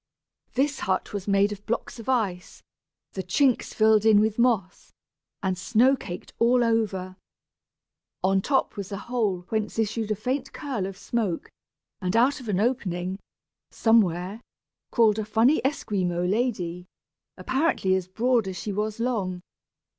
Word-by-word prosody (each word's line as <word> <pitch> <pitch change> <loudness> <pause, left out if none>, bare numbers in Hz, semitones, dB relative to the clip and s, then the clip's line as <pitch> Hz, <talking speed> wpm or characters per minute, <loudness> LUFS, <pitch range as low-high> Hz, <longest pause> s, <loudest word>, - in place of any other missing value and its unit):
This 280 +2 0
hut 190 +1 -1
was 200 -1 -4
made 200 +1 +3
of 205 -1 -7
blocks 235 +1 -3
of 230 - -7
ice, 200 -8 -1 0.5
the 190 - -4
chinks 250 +8 +1
filled 220 -1 +4
in 220 -2 +6
with 215 +1 +1
moss, 220 -7 0 0.5
and 190 -1 0
snow 230 +8 +3
caked 180 -8 -8
over 230 -4 +3 1.3
all. 190 - +3
On 195 0 +3
top 270 +6 0
was 200 0 -5
a 200 - -3
hole 210 -5 -1
whence 215 -1 -2
issued 225 0 -1
a 215 - +1
faint 255 +6 -3
curl 255 -11 -3
of 195 -1 -8
smoke, 200 -4 -2 0.5
and 180 +1 -1
out 260 +6 +3
of 245 -4 -8
an 190 -2 +1
opening, 190 -6 -1 0.5
somewhere, 200 -2 +2 0.5
crawled 220 -3 +4
a - - -1
funny 225 +8 +3
Esquimaux 185 -10 -1
lady, 185 -5 -1 0.5
apparently 265 - +1
as 190 -1 0
broad 230 +2 +1
as 185 -1 -5
she 205 - -4
was 210 +2 -2
long. 200 -7 -1
215 Hz, 145 wpm, -26 LUFS, 190-235 Hz, 1.3 s, in